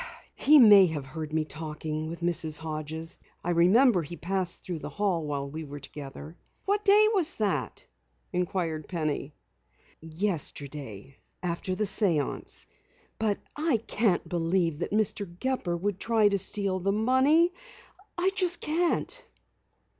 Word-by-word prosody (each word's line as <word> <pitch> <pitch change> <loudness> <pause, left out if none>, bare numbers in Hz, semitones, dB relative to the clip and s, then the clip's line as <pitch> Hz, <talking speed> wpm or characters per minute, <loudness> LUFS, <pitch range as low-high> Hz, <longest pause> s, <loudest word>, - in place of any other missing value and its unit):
"He 300 +2 +5
may 205 -7 +8
have 150 -4 -4
heard 155 +3 -6
me 155 0 0
talking 155 0 -5
with 170 +2 -7
Mrs. 165 -3 0
Hodges. 160 +1 -5 0.2
I 175 - -1
remember 185 +5 +5
he 170 +2 -8
passed 185 +1 -2
through 175 -3 -4
the - - -6
hall 180 -5 -1
while 140 -1 -3
we 155 +3 -6
were 145 -1 -8
together." 145 +3 -9 0.3
"What 410 +1 +1
day 420 +1 +6
was 365 -6 +2
that?" 210 -3 -2 0.5
inquired 175 -4 -2
Penny. 155 -4 -3 0.7
"Yesterday. 145 - -4 0.3
After 180 +1 -2
the 215 - -1
séance. 190 -7 0 0.5
But 215 -2 +1 0.2
I 300 -4 +1
can't 220 -3 0
believe 170 -2 0
that - - -2
Mr. 205 -2 +1
Gepper 255 -10 -1
would 195 +2 -2
try 220 -2 +3
to 200 -1 0
steal 195 0 0
the 195 +2 0
money. 260 - +3 0.6
I 365 +2 +2
just 365 -3 +2
can't!" 345 +10 -1
180 Hz, 140 wpm, -28 LUFS, 155-220 Hz, 0.7 s, may